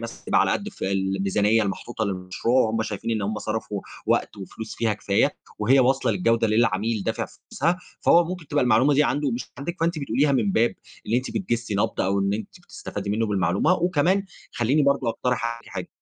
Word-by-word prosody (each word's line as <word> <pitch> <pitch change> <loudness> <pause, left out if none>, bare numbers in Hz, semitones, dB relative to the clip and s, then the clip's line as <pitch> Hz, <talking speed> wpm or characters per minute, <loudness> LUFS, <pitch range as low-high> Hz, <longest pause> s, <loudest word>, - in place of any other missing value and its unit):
مثلًا 115 0 -8
تبقى - - +3
على - - +2
قد - - -1
الف - - -9
الميزانية 95 +3 +1
المحطوطة 110 +3 -3
للمشروع، 95 +6 0
وهم 110 +1 0
شايفين 110 +1 -4
إن 110 -2 0
هم 105 +2 -2
صرفوا 105 -2 -3 0.3
وقت - - +1
وفلوس 110 +3 -8
فيها 115 -2 0
كفاية 100 -1 +1 0.2
وهي 125 +6 +4
واصلة 130 +2 +2
للجودة 115 -10 +2
اللي 110 -1 +2
العميل 110 -1 +1
دافع - - -2
فلوسها، 170 +5 -2 0.2
فهو 170 0 +5
ممكن 175 -2 -6
تبقى 145 -2 +2
المعلومة 125 +4 +4
دي 150 +2 +4
عنده 145 0 0
مش 240 - -4
عندِك، 170 +5 -4
فأنتِ 165 -1 +1
بتقوليها 140 +1 +1
من 115 -7 +1
باب 115 -1 +2 0.3
إن 110 - 0
أنتِ 125 +2 0
بتجسي 120 - -2
نبض 100 - 0
أو 100 +1 +1
أن 100 0 +1
أنتِ 110 -1 -7
بتستفادي 100 0 -6
منه 110 +2 0
بالمعلومة. 95 - +2
وكمان 180 +3 +1 0.3
خليني 130 +6 +2
برضه 140 -3 +2
اقترح 125 0 -1
عليكِ 115 - -16
حاجة 95 -2 -6
115 Hz, 195 wpm, -24 LUFS, 100-140 Hz, 0.3 s, فهو